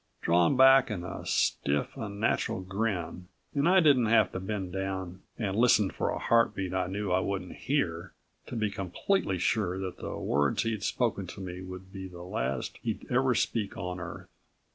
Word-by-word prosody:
Drawn 85 +9 +3
back 135 0 +7
in 95 -5 -3
a 90 - -6
stiff, 70 +1 0
unnatural 105 -5 -1
grin 95 -3 -3 0.3
and 145 +3 +2
I 190 +1 +6
didn't 135 -7 +5
have 110 -2 +4
to - - -4
bend 95 -2 -4
down 95 -1 -4 0.2
and 100 -4 -2
listen 110 -4 +4
for - - -2
a - - -1
heartbeat 105 -5 +1
I 95 -1 0
knew 100 +1 -3
I 90 - +4
wouldn't 95 -1 -3
hear 95 - -2 0.3
to - - -6
be 110 -3 0
completely 100 - -1
sure 90 0 0
that 95 -1 -5
the - - -5
words 70 0 +1
he'd 115 -3 -2
spoken 105 -3 -1
to 90 - -9
me 90 -1 -6
would 95 0 -9
be 95 -1 -6
the 90 -1 -10
last 65 -7 -3
he'd 110 -3 -3
ever 130 0 +3
speak 110 -2 -1
on 90 0 -4
Earth. 90 -1 -7
95 Hz, 180 wpm, -29 LUFS, 90-115 Hz, 0.3 s, back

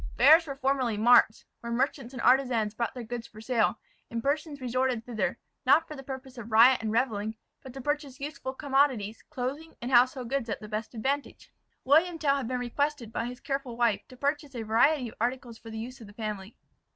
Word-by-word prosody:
Fairs 315 +6 +7
were 275 - -4
formerly 265 -5 0
marts, 225 0 +5
where 235 - -6
merchants 255 0 -1
and 255 -3 -6
artisans 245 -5 +3
brought 235 +2 -3
their 250 - -5
goods 235 0 -6
for 215 - -14
sale; 225 -1 +1 0.3
and 230 0 -4
persons 295 +1 -1
resorted 255 -2 -1
thither, 235 -3 -2 0.3
not 325 0 +4
for 305 - -8
the 270 - -8
purpose 265 -1 -8
of 230 0 -9
riot 235 +3 +7
and 220 -1 -2
revelling, 220 -2 -1 0.2
but 260 - -10
to 270 +2 -8
purchase 290 -1 -3
useful 280 -2 -5
commodities, 265 -6 +1
clothing, 290 +3 -5
and 245 +2 -5
household 250 0 +4
goods 260 -2 -2
at 205 - -2
the 215 - -9
best 215 +3 -5
advantage. 275 +6 -3 0.3
William 325 +5 +4
Tell 280 -3 +2
had 270 - -3
been 255 +1 -1
requested 245 -1 -2
by - - -1
his 250 0 -7
careful 270 -4 -4
wife 230 -4 +2
to 255 - -14
purchase 285 0 -2
a 230 - -3
variety 245 +5 +3
of - - -15
articles 240 -1 -2
for 225 - -11
the 220 - -7
use 240 +3 -7
of 220 - -10
the 205 - -14
family. 210 -2 -6
250 Hz, 210 wpm, -28 LUFS, 230-275 Hz, 0.3 s, Fairs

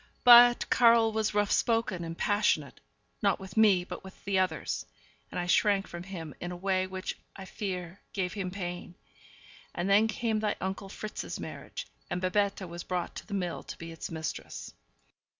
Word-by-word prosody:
But 240 0 +9
Karl 230 -2 +6
was 220 -1 -1
rough 205 -1 +2
spoken, 225 -7 +1
and 165 0 -6
passionate 205 -9 +1 0.4
not 200 -2 +2
with 190 -1 -10
me, 205 -5 +5
but 180 - -8
with 190 0 -13
the 195 -1 +2
others 185 0 -1 0.5
and - - -4
I 175 - -1
shrank 195 +3 +3
from 175 - -7
him 170 -5 -7
in 175 - -5
a - - -5
way 185 +1 0
which, 185 0 -5 0.2
I 195 - -8
fear, 185 -2 -5
gave 185 -3 -2
him 195 -3 -3
pain. 180 -2 -6 0.8
And 175 - -1
then 205 +3 +5
came 220 0 -1
thy 215 -1 0
uncle 195 +1 -4
Fritz's 215 +2 -6
marriage; - - -7 0.2
and 175 - -1
Babette 195 +1 0
was 170 0 -7
brought 180 -1 -3
to - - -8
the 205 - -3
mill 180 -3 -2
to - - -9
be 165 0 -8
its 165 - -6
mistress. 160 -3 -5
190 Hz, 180 wpm, -30 LUFS, 180-210 Hz, 0.8 s, But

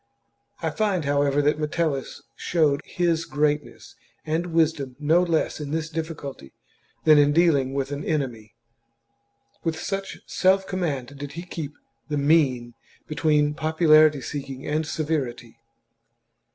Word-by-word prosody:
I - - 0
find, 200 -7 0
how 140 0 +1
chap 145 - +2
ever, 140 +1 +2
that 150 +1 +2
Metellus 150 -2 -2
showed 155 -4 +1
his 170 -2 0
greatness 150 +1 -2 0.3
and 160 +3 -1
wisdom 160 -6 0
no 155 +4 +3
less 170 -3 0
in 150 -2 -5
this 160 +1 -3
difficulty 155 - -6 0.5
than 155 -2 +7
in 145 0 +4
dealing 145 -5 +3
with 135 0 -2
an 145 +1 -4
enemy; 125 -9 -3 1.1
with 160 -2 -2
such 195 -1 -4
self 190 +1 +2
command 145 -9 -3
did 145 0 -6
he 170 +3 -6
keep 160 -5 -6 0.4
the 150 - -1
mean 140 -5 +2 0.3
between 150 -1 +1
popularity 155 -2 +4
seeking 135 -1 -6
and 155 +1 -1
severity. 140 -8 -3
150 Hz, 135 wpm, -24 LUFS, 140-165 Hz, 1.1 s, than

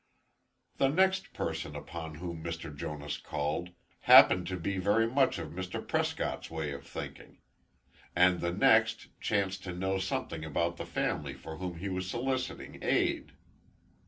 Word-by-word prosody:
The 135 - +4
next 190 +6 +2
person - - -3
upon 80 -2 -6
whom 85 0 -6
Mr. 80 -2 -5
Jonas 75 +1 -4
called, 75 +5 -2 0.4
happened 90 -1 +9
to 95 0 -2
be 95 +3 -2
very 105 +4 +3
much 130 +3 +2
of - - -5
Mr. 95 +1 -5
Prescott's - - -1
way 80 -2 -3
of 70 0 -8
thinking; - - -8 0.8
and 90 0 +5
the 85 - 0
next 110 +1 +3
chanced 100 -2 0
to 90 - -4
know 95 +1 0
something 85 -4 -3
about 85 +2 -1
the - - -6
family 70 -3 -2
for 80 +4 -8
whom 90 -1 -5
he 95 +4 -4
was 95 0 -3
soliciting 130 +3 -3
aid. - - +1
90 Hz, 150 wpm, -31 LUFS, 80-100 Hz, 0.8 s, happened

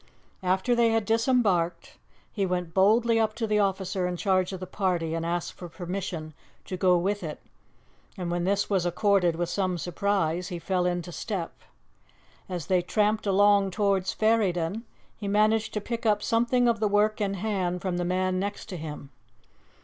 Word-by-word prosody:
After 190 +6 +1
they 235 -1 +4
had 225 -1 +1
disembarked, 210 -7 +1 0.3
he 200 - -1
went 180 -3 -2
boldly 225 +5 +4
up 220 -1 +1
to 225 0 -2
the 210 -1 +1
officer 190 -2 0
in 180 0 -3
charge 185 0 +1
of 190 - -5
the 185 - -5
party 175 -4 -1
and 165 0 -2
asked 170 0 -2
for 175 - -9
permission 175 -2 -5 0.3
to 185 - -4
go 180 -1 +3
with 200 +4 -1
it, 155 -4 -6 0.8
and 175 -2 -3
when 175 0 -1
this 200 +2 +1
was 195 -4 +1
accorded 180 -1 +2
with 175 +1 -1
some 185 0 -1
surprise, 180 -1 -1
he 180 - -5
fell 180 +1 0
into 175 -1 -2
step. 180 -1 -4 1.0
As 175 -5 -4
they 185 -1 +2
tramped 210 +3 0
along 200 0 +4
towards 195 -1 +1
Ferryden, 215 -2 +1 0.3
he 205 - -5
managed 215 +2 +2
to - - +1
pick 230 +2 -4
up 210 -2 +2
something 240 +2 +2
of 230 -2 +2
the 215 - +2
work 210 +1 +2
in 200 -1 0
hand 185 -3 -2
from 185 -2 -1
the 175 - -1
man 185 +1 0
next 200 +1 -4
to 185 - -5
him. 150 -3 -8
190 Hz, 180 wpm, -27 LUFS, 175-210 Hz, 1.0 s, they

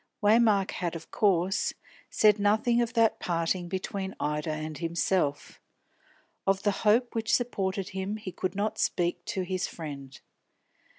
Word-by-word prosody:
Waymark 210 -2 +4
had 175 -2 -3
of 165 - -9
course 190 -2 +1 0.3
said 210 -1 +4
nothing 220 +4 +3
of 235 -1 -1
that 230 -2 +3
parting 175 +1 -1
between 190 +1 -4
Ida 150 +1 -1
and 155 -1 -4
himself. 165 -3 -1 0.9
Of 195 0 +2
the 205 - +3
hope 230 +3 +3
which 225 -1 -1
supported 195 -6 -2
him 190 +2 -3
he 205 -3 -7
could 185 0 -3
not 205 +2 -1
speak 175 0 0
to 205 -4 -2
his 185 0 -2
friend. 140 -5 -8
190 Hz, 140 wpm, -28 LUFS, 170-210 Hz, 0.9 s, Waymark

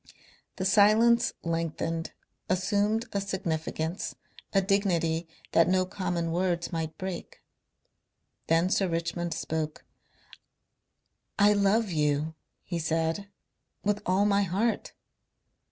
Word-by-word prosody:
The 185 - -3
silence 220 +4 +5
lengthened, 165 0 -2 0.4
assumed 205 +4 +1
a 200 - 0
significance, 170 -3 -3 0.4
a 195 - +4
dignity 175 -4 +1 0.2
that 165 - +5
no 185 0 +3
common 180 -3 -2
words 175 0 -1
might 160 -1 -3
break. 185 -2 -6 1.0
Then 165 +3 +3
Sir 195 - +2
Richmond 170 0 -2
spoke. 155 -1 -3 1.5
"I 205 0 +6
love, 205 +1 +2
you," 150 0 +1 0.3
he 175 -2 -3
said, 165 +4 -1 0.6
"with 205 0 0
all 190 +3 +3
my 200 -1 +3
heart." 200 +5 0
180 Hz, 105 wpm, -28 LUFS, 165-200 Hz, 1.5 s, I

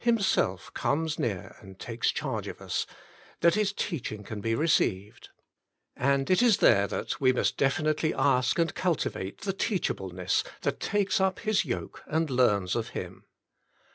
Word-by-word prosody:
Himself 200 - +1
Comes 155 +1 -1
Near 100 -7 -3
and 95 -2 -13
Takes 115 +2 -2
Charge - - -3
of - - -6
Us^ - - -3 0.5
that 170 0 +5
His 210 -1 +1
teaching 130 - -4
can 105 0 -6
be 115 +2 0
received. 105 - 0 0.7
And 140 +1 +1
it 185 - +4
is 235 -5 +5
there 100 +1 +5
that - - -4
we 130 -1 +5
must 125 - 0
definitely 155 +3 +1
ask 130 -2 +2
and 165 -1 +1
cultivate 155 - -2
the 195 -1 -2
teachableness 95 - -1 0.2
that - - -1
takes 195 -2 +1
up 190 0 +1
His 215 -1 +1
yoke - - -5
and 160 -1 0
learns 105 -8 +2
of 115 -2 -2
Him. - - -7
140 Hz, 155 wpm, -28 LUFS, -, 0.7 s, that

